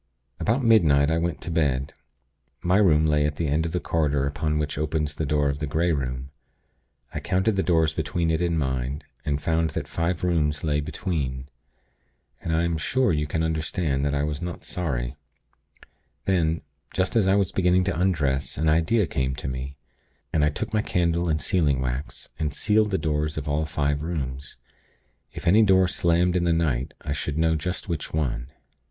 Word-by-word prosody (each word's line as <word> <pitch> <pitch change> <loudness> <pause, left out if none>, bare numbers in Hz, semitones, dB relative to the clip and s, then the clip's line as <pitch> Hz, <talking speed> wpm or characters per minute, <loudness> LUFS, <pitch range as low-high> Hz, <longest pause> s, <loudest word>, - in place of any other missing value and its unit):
"About 120 +5 +1
midnight, 80 - +5
I 80 - +2
went 85 -1 -2
to 85 - -5
bed. 70 -4 0 0.7
My 90 +2 +3
room 80 -7 +4
lay 75 -1 +3
at 75 0 0
the 80 +1 -1
end 80 +3 +1
of - - -5
the 90 - 0
corridor 75 -5 0
upon 75 +2 -1
which 75 -1 -2
opens 75 0 -1
the 80 -1 -3
door 75 0 +2
of 70 0 -1
the 75 - -2
Grey 85 +4 +1
Room. 65 -2 -3 0.8
I - - -2
counted 95 +8 +1
the 95 - +2
doors 80 -4 +2
between 80 +1 -1
it 80 +1 0
and 85 -1 +1
mine, 65 0 -2 0.2
and 70 -1 0
found 80 +1 +1
that - - -4
five 85 +1 -2
rooms 75 -4 +1
lay 75 -2 +1
between. 70 -4 -3 0.9
And 80 - -3
I 80 +1 +2
am 85 -1 0
sure 130 +6 +1
you 75 -1 0
can 80 +2 -1
understand 80 -3 -1
that 70 0 0
I 70 - 0
was 75 0 -2
not 90 -1 -5
sorry. 70 -7 -3 1.1
Then, 85 -4 +1 0.3
just 95 +6 0
as 105 -5 +4
I 95 - +4
was 100 -3 +1
beginning 90 0 +3
to 90 -3 -1
undress, 70 -8 0
an 80 +1 +2
idea 85 +7 +3
came 65 -3 -1
to 70 - -6
me, 65 +1 -5 0.6
and 75 - +3
I 75 - +4
took 75 +8 -5
my 110 - +3
candle 85 -3 0
and 75 -1 +1
sealing 75 -4 +1
wax, 65 +2 -4
and 75 -1 0
sealed 105 +7 +2
the 95 - +1
doors 75 -1 -1
of 75 - -4
all 75 +2 0
five 75 -1 -1
rooms. 70 -4 -4 0.8
If - - -8
any 100 +6 +6
door 95 -3 +5
slammed 90 0 +2
in 90 -1 +2
the 85 - +3
night, 70 -7 0
I 75 - -5
should 75 +1 -3
know 80 0 +3
just 90 +5 -3
which 85 -5 -3
one. 65 -6 -1
80 Hz, 195 wpm, -25 LUFS, 70-85 Hz, 1.1 s, any